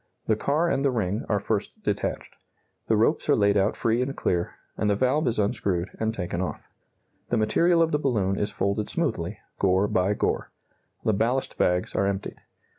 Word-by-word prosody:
The 110 - +2
car 145 +9 +1
and 135 -4 +1
the 140 - +4
ring 110 -3 -1
are 105 - +2
first 100 0 -3
detached. - - -2 0.5
The - - +3
ropes - - +2
are - - +6
laid 100 0 +3
out 100 +1 +2
free 115 +2 +1
and 135 +2 -3
clear, 85 -1 -1 0.2
and 105 - 0
the 100 - +3
valve 130 +7 +1
is 120 - +1
unscrewed 95 -3 0
and 110 0 +1
taken 90 -4 -3
off. 90 - -5 0.6
The 120 - +1
material 165 +10 +3
of 165 - 0
the 150 - +1
balloon 105 -9 +1
is 105 +1 -1
folded 100 +1 -1
smoothly, - - -2 0.2
gore 95 +1 +3
by 95 +2 +1
gore. - - -1 0.5
The 110 - +2
ballast 120 +6 0
bags 90 0 +1
are 100 - +1
emptied. 100 0 -3
105 Hz, 190 wpm, -26 LUFS, 100-125 Hz, 0.6 s, are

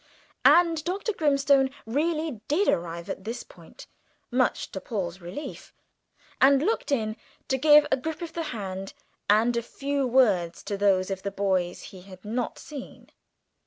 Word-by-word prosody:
And 335 -3 +5
Dr. 395 +5 -2
Grimstone 280 -4 +3 0.2
really 305 0 -1
did 360 +8 +2
arrive 170 0 -1
at 190 - -5
this 230 +4 -5
point, - - -15 0.5
much 250 0 0
to 190 - -6
Paul's 190 -4 -4
relief, 180 - -8 0.7
and 275 +1 +6
looked 430 -4 -1
in 220 -5 0 0.3
to 265 - +2
give 300 +1 +7
a - - +4
grip 320 +5 -5
of 330 -1 -7
the 335 -1 -3
hand 195 -4 -6 0.3
and 225 +3 +4
a 235 - +1
few 275 +3 -2
words 205 -10 +2
to 205 - -3
those 195 -1 +2
of 190 -1 -3
the 200 - -3
boys 190 -3 -1
he 185 - -11
had 185 0 -14
not 235 +3 -3
seen. 285 -4 -10
240 Hz, 160 wpm, -26 LUFS, 195-295 Hz, 0.7 s, give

